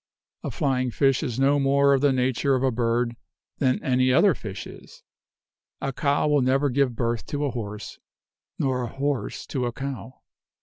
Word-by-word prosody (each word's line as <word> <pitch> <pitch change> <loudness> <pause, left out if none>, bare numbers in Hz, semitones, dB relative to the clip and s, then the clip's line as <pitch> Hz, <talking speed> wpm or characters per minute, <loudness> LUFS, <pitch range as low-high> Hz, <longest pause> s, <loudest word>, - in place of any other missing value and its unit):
A - - -3
flying 130 -2 0
fish 135 +2 +2
is 130 -6 -3
no 140 +2 +3
more 140 +1 +4
of 135 - +2
the 145 -1 +4
nature 130 +1 +1
of 130 - -1
a 130 - +3
bird 120 0 0 0.4
than 130 -2 +2
any 130 0 +2
other 190 +8 +5
fish 100 -7 -7
is. - - -13 0.8
A 135 - -3
cow 145 +2 +1
will 145 -2 +3
never 135 +2 +2
give 130 -2 +1
birth 115 0 -2
to 145 -1 -2
a 140 - -1
horse, 105 -4 -6 0.6
nor 130 -2 0
a 120 - -2
horse 140 +2 -3
to 125 -3 -2
a - - -2
cow. 135 0 -7
130 Hz, 180 wpm, -25 LUFS, 125-140 Hz, 0.8 s, other